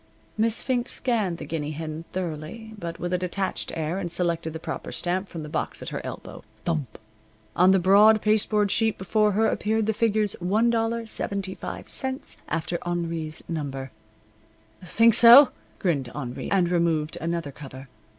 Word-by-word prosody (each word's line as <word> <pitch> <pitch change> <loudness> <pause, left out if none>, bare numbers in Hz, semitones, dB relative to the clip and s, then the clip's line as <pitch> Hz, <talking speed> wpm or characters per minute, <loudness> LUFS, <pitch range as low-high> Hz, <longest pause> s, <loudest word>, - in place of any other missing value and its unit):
Miss 225 +1 +1
Fink 245 -2 -1
scanned 215 -9 -1
the - - -7
guinea 155 -2 -3
hen 160 +1 -6
thoroughly, 185 +5 -5
but 170 -3 -5
with 175 +1 -3
a 180 - +1
detached 185 +1 -2
air, 165 +3 -2
and 175 -3 -3
selected 170 -2 -1
the 160 - -5
proper - - -6
stamp 185 +2 -2
from 165 -2 -6
the - - -7
box - - -3
at - - -5
her - - -4
elbow. - - -8 0.2
Thump! 155 -9 -2 0.6
On 180 +2 +5
the 190 - +6
broad 205 +4 +6
pasteboard 210 -1 +2
sheet 225 -1 +1
before 210 +2 +1
her 220 +3 +2
appeared 220 0 0
the 220 - +1
figures 215 -2 +1
$1.75 225 +3 -1
after 165 +1 -2
Henri's 165 -2 -3
number. 135 -5 -4 0.9
"Think 230 +6 +4
so?" 240 +5 +9 0.3
grinned 145 -9 -1
Henri, 125 -4 -5
and 180 -3 +2
removed 165 -3 0
another 165 -2 -2
cover. 135 -1 -10
180 Hz, 150 wpm, -25 LUFS, 160-215 Hz, 0.9 s, so